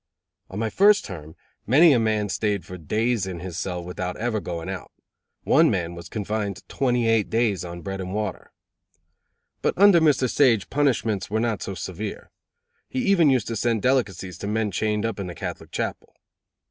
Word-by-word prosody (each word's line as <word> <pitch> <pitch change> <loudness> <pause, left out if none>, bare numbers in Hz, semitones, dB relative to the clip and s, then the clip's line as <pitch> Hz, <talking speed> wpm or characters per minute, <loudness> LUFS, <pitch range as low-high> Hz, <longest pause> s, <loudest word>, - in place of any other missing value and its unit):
On 95 - -7
my 110 0 -1
first 205 +1 +5
term 80 -6 -9 0.3
many 150 +7 +7
a 120 - +3
man 110 -2 +1
staid 100 -1 -1
for 90 - -8
days 110 +5 -1
in 90 -2 -5
his 90 -1 -7
cell 90 0 -3
without 90 0 -5
ever 115 -1 -1
going 85 -3 -5
out; 95 -1 -6 0.5
one - - +5
man 85 -1 -1
was 85 0 -10
confined 105 -1 -3
twenty 125 -3 0
eight 115 -2 +2
days 110 -5 +1
on 85 0 -8
bread 95 -1 -4
and 90 0 -5
water. 105 -2 -4 1.1
But - - 0
under 195 -3 +7
Mr. 145 -5 +3
Sage 120 -5 +2
punishments 115 -9 0
were 110 +2 0
not 115 -3 -1
so 95 - -4
severe. 95 +3 -6 0.6
He 255 -1 -2
even 185 -7 +5
used 130 -5 +2
to 115 - -2
send 115 -1 0
delicacies 95 -9 0
to 100 - -5
men 105 0 0
chained 105 +3 0
up 115 -2 -3
in 95 - -4
the 90 - -7
Catholic 80 - -6
Chapel. - - -4
105 Hz, 185 wpm, -24 LUFS, 95-120 Hz, 1.1 s, many